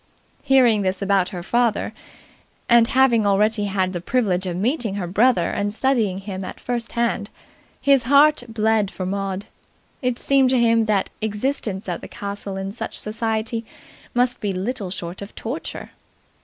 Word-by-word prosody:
Hearing 255 -6 +4
this 190 0 -1
about 195 -2 +2
her 180 -4 -6
father, 235 +2 +1 0.7
and 235 -1 +6
having 260 -3 +4
already 205 +1 +2
had 190 -2 0
the 175 - -4
privilege 190 -4 0
of 175 -1 -3
meeting 230 - -1
her 200 -3 -3
brother 205 +1 +2
and 205 0 -1
studying 225 -5 +1
him 195 -1 -6
at 185 - -7
first 240 -1 -3
hand, 235 -3 -1 0.5
his 275 -2 +4
heart 295 +1 +6
bled 220 -2 +1
for 185 - -5
Maud. 195 +1 -3 0.6
It 250 -2 0
seemed 270 -1 +3
to 255 -1 +3
him 230 -1 +3
that 210 -3 0
existence 215 -2 -2
at 175 -2 -3
the - - -8
castle 200 -1 -5
in 195 0 -4
such 220 - -5
society 225 +1 -2 0.5
must 245 +1 +2
be 205 - -1
little 200 +1 -3
short 180 0 -6
of 200 - -9
torture. 260 +9 -6
215 Hz, 160 wpm, -22 LUFS, 195-240 Hz, 0.7 s, and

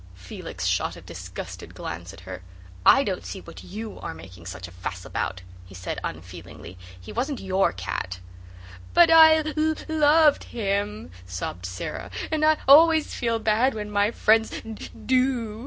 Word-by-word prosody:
Felix 90 0 -7
shot - - 0
a - - -11
disgusted - - -8
glance 85 +1 -6
at 95 -1 -13
her. 90 0 -8 0.5
"I 275 - +7
don't 190 -8 -3
see 195 - -6
what - - -12
YOU 215 +3 -7
are - - -6
making 90 +1 -12
such 90 0 -7
a - - -14
fuss 90 0 -6
about," 95 -1 -3 0.2
he 95 - -13
said 90 +1 -5
unfeelingly. 85 0 -8 0.2
"He 90 - -10
wasn't 265 +3 -2
your 190 0 +1
cat." 90 0 -4 0.8
"But 340 -1 +7
I 320 -1 +9
l 310 -1 -1
l - - -5
oved 310 -1 +3
him," 195 - -2 0.2
sobbed 90 0 -5
Sara, 90 0 -6 0.2
"and 310 -1 0
I 310 0 +5
always 315 +2 +6
feel 230 -2 0
bad 225 +3 +2
when 210 -1 -5
my 205 0 +2
friends 225 -1 +3
d 220 -1 -8 0.2
do." 255 -4 +1
210 Hz, 165 wpm, -25 LUFS, -, 0.8 s, I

